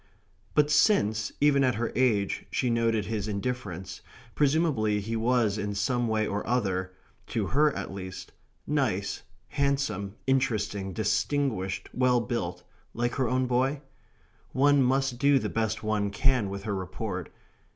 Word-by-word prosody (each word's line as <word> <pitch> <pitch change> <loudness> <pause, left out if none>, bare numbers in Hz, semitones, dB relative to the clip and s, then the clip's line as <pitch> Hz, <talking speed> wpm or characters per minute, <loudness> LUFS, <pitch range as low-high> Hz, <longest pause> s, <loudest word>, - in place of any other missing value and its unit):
But 150 0 +4
since, 110 - +3
even 140 -1 +4
at 125 -4 +2
her 115 +2 -2
age, 110 -6 +1
she 125 -2 0
noted 115 -2 +1
his 110 -2 -3
indifference, 100 -4 -4 0.3
presumably 140 -8 +2
he 110 +3 -3
was 115 -2 +1
in 105 0 -3
some 120 +4 0
way 110 -1 +1
or 100 0 -2
other 95 -6 0 0.3
to - - -1
her 150 +2 +4
at - - -5
least 95 -1 -7 0.3
nice, 105 -10 -1 0.3
handsome, 135 -9 -1
interesting, 105 -7 0
distinguished, 110 0 -1
well 125 -1 +3
built, 90 -7 -3 0.3
like 120 +1 0
her 130 -4 0
own 130 0 +1
boy? 130 +3 +1 0.7
One 145 +1 +4
must 130 -1 +1
do 140 +1 +5
the - - -1
best 110 -1 -1
one 105 -1 0
can 120 0 +1
with 100 0 -6
her 105 -1 -2
report. 95 -1 -4
115 Hz, 140 wpm, -28 LUFS, 100-130 Hz, 0.7 s, do